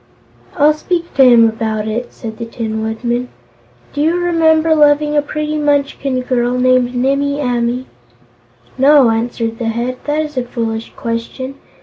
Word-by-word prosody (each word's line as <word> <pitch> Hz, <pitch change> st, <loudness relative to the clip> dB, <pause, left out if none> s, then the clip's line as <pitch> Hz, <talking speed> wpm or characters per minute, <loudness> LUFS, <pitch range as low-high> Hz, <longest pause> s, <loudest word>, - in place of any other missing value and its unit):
"I'll 300 Hz, 0 st, +5 dB
speak 340 Hz, +2 st, -3 dB
to 270 Hz, -, +5 dB
him 240 Hz, -3 st, +7 dB
about 220 Hz, -1 st, -2 dB
it," 235 Hz, +3 st, -3 dB
said 220 Hz, -1 st, -8 dB
the 230 Hz, -, -4 dB
Tin 220 Hz, -1 st, -4 dB
Woodman. 235 Hz, +3 st, -2 dB, 0.7 s
"Do 290 Hz, -, -2 dB
you 320 Hz, +3 st, +2 dB
remember 325 Hz, -2 st, +2 dB
loving 295 Hz, 0 st, +3 dB
a 295 Hz, -, +4 dB
pretty 305 Hz, +1 st, -3 dB
Munchkin 280 Hz, -3 st, 0 dB
girl 250 Hz, -1 st, 0 dB
named 255 Hz, 0 st, +2 dB
Nimmie 275 Hz, +3 st, 0 dB
Amee?" 245 Hz, -1 st, -1 dB, 0.9 s
"No," 275 Hz, -3 st, +6 dB
answered 230 Hz, 0 st, -2 dB
the 235 Hz, -, -3 dB
Head. 240 Hz, +3 st, -2 dB
"That 300 Hz, +1 st, 0 dB
is 300 Hz, -2 st, -8 dB
a 255 Hz, -, +1 dB
foolish 225 Hz, -2 st, -4 dB
question. 230 Hz, +3 st, -4 dB
255 Hz, 150 wpm, -16 LUFS, 235-295 Hz, 0.9 s, him